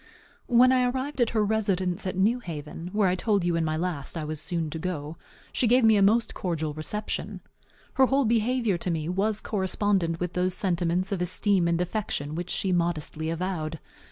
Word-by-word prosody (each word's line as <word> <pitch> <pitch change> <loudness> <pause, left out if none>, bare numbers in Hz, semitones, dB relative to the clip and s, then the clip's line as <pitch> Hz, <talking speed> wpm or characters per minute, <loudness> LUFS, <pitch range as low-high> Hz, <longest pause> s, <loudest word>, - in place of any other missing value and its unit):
When 250 +1 +6
I 255 -1 +3
arrived 265 +2 -3
at 235 - +3
her 215 -2 +1
residence 195 -4 -1
at 185 - -3
New 220 +6 +2
Haven, 165 -3 -7
where 205 -1 +2
I 180 - +2
told 200 0 +1
you 175 -1 +1
in 165 - +1
my 155 0 -1
last 170 -3 -3
I 160 - -3
was 155 0 -3
soon 165 -4 -1
to 160 - -4
go, 160 -3 -4 0.4
she 245 - +3
gave 250 +2 +4
me 220 -1 +6
a 200 - +3
most 225 +4 +3
cordial 160 -4 -2
reception. 210 +8 -4 0.5
Her 265 -1 +4
whole 270 +1 +2
behavior 230 -3 +1
to 180 - -2
me 160 -2 -2
was 200 +4 0
correspondent 190 -4 0
with 180 -1 -3
those 180 0 +2
sentiments 180 -1 0
of 190 -3 -1
esteem 185 0 +1
and 170 0 +1
affection 180 -6 -2
which 175 +2 -4
she 190 - 0
modestly 165 -2 -1
avowed. 165 -2 -3
185 Hz, 195 wpm, -26 LUFS, 165-215 Hz, 0.5 s, When